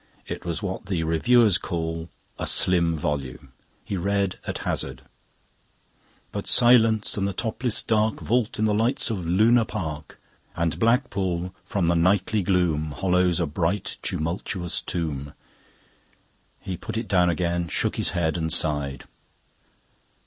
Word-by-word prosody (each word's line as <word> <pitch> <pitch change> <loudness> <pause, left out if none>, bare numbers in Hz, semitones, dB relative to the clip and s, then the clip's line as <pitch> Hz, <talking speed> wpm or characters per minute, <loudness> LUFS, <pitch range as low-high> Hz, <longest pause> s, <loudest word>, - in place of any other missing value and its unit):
It - - -6
was 85 +3 -3
what 95 0 -4
the 90 -5 -1
reviewers 100 +5 +4
call 80 -1 -4 0.3
"a - - -2
slim 85 -3 +2
volume." 70 -4 -4 0.3
He 100 -1 -3
read 100 +1 -1
at - - -2
hazard: 65 0 -2 1.3
"...But 100 - -5
silence 115 -4 +4
and 100 -1 0
the 100 - -3
topless 115 +2 -1
dark 110 -1 +1
Vault 120 0 0
in 110 - +1
the 105 - +2
lights 115 +3 +1
of 95 -6 -3
Luna 110 +7 +4
Park; 75 -7 -6 0.4
And 85 -1 -1
Blackpool 100 -8 0
from 100 -4 -1
the 85 +1 +2
nightly 95 +5 +2
gloom 85 -5 +1
Hollows 90 0 +2
a 85 - +1
bright 85 +6 -2
tumultuous 85 +2 -2
tomb." 70 -5 -4 1.3
He 95 - -5
put - - -6
it 115 -1 -3
down 90 -3 +3
again, 85 +1 -1
shook - - -1
his - - +1
head, 80 -1 +1
and 80 0 -1
sighed. 75 -4 0
90 Hz, 140 wpm, -25 LUFS, 80-105 Hz, 1.3 s, reviewers